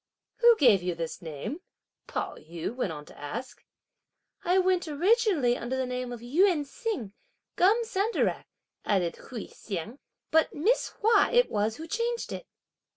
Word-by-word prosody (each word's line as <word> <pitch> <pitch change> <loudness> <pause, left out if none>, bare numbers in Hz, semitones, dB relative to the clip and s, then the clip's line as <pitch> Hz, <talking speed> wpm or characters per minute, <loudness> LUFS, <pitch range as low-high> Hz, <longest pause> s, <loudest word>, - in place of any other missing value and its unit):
"Who 470 -1 +6
gave 230 - +5
you 180 -1 -2
this 165 -1 -5
name?" 165 - -6 0.5
Pao - - -3
yü 165 +7 -6
went 250 -9 -1
on 150 -2 -7
to - - -15
ask. 225 - -6 0.8
"I 360 +2 +3
went 370 -1 +2
originally 340 - +3
under 250 +2 -3
the 260 - 0
name 250 0 -4
of 240 -2 -7
Yün 305 +5 +3
Hsiang 375 - -4 0.4
(Gum 420 +6 +4
Sandarac)," 445 0 0 0.4
added 180 -5 0
Hui 235 -5 -7
Hsiang, 210 - -6 0.3
"but 320 0 +3
Miss 425 +12 +2
Hua 445 +3 +5
it - - +4
was 215 +1 0
who 320 - -7
changed 470 +6 -2
it." - - -7
275 Hz, 155 wpm, -28 LUFS, -, 0.8 s, Who